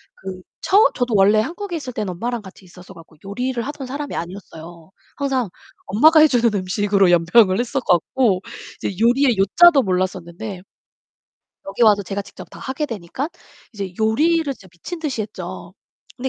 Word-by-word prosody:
그 185 -1 -8 0.2
처음 410 +3 +5
저도 245 -3 -1
원래 205 +2 +5
한국에 350 - -5
있을 255 -5 -7
때는 210 -5 -3
엄마랑 235 +5 -3
같이 190 -1 -14
있어서 180 +1 -14
갖고 165 -2 -16
요리를 245 +4 -3
하던 290 -3 -6
사람이 285 +2 -5
아니었어요. 170 -1 -9 0.3
항상 265 -7 -1 0.4
엄마가 310 +10 +5
해 310 - +8
주는 240 -4 +2
음식으로 195 0 +1
연명을 185 +4 +4
했어 250 +3 -1
갖고 195 +1 +1 0.4
이제 195 - -3
요리의 245 -1 +3
요자도 275 - +5
몰랐었는데 185 0 -3 1.1
여기 200 +5 -2
와서 210 -2 +5
제가 200 +2 -4
직접 - - -13
다 - - -12
하게 270 +3 -3
되니까 230 - -5 0.4
이제 195 -3 -6
요리를 315 +10 +2
진짜 190 -5 -18
미친 325 - -8
듯이 275 -9 -3
했죠. 185 -3 -8 0.4
근데 265 +2 -3
215 Hz, 360 characters per minute, -20 LUFS, 185-260 Hz, 1.1 s, 해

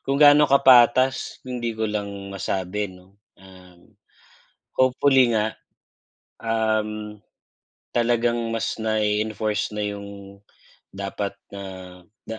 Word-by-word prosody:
kung 135 0 -2
gaano 145 0 +7
kapatas, 130 -1 +4
hindi 120 -3 -4
ko 110 - -1
lang 105 -1 -2 0.2
masabi 100 +1 -3
'no. 95 +2 -18 0.2
Um, 90 -2 -18 0.8
hopefully 130 -2 +3
nga, 110 0 0 0.9
um, 110 -2 -2 0.7
talagang 120 -1 +1
mas 115 0 -2
nai-enforce 110 -1 -1
na 105 0 -3
'yung 100 -1 -9 0.5
dapat 100 +1 -4 0.2
na 100 0 -8 0.7
na 110 - -5
110 Hz, 95 wpm, -23 LUFS, 100-120 Hz, 0.9 s, gaano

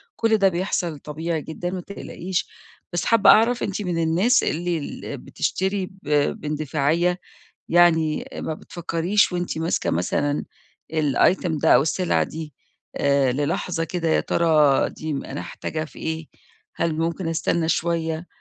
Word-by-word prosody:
كل 225 -1 +2
ده 195 -1 +4
بيحصل 175 -3 -2
طبيعي 160 +1 -3
جدًا 175 +4 -5
ما 185 -1 -4
تقلقيش. 185 -1 -4 0.5
بس 175 - -1
حابّة 225 -4 +5
أعرف 235 +3 +5
أنتِ 205 +1 -2
من 170 -3 -1
الناس 185 +11 +3
اللي 175 +1 -1
ال 145 - -6
بتشتري 190 0 -2
ب 190 -5 -13 0.3
باندفاعية؟ 155 +4 0 0.5
يعني 160 -3 +3
ما 160 - -3
بتفكِّريش 175 +5 0
وأنتِ 175 -2 -2
ماسكة 165 +1 0
مثلًا 145 - 0 0.5
الitem 160 +2 +2
ده - - +6
أو - - +6
السلعة 180 +3 +1
دي 155 -3 -8 0.4
آآ، 140 -2 +2
للحظة 165 +4 -1
كده: 170 -1 -2
يا - - +3
ترى 155 -5 +3
دي 155 -1 -5
م 140 - -3
أنا 140 - -5
هاحتاجها 155 0 -5
في - - -13
إيه، 160 -1 -4 0.5
هل 165 -2 0
ممكن 165 +1 -1
أستنّى 165 0 0
شوية؟ 165 0 -1
165 Hz, 145 wpm, -23 LUFS, 155-180 Hz, 0.5 s, ده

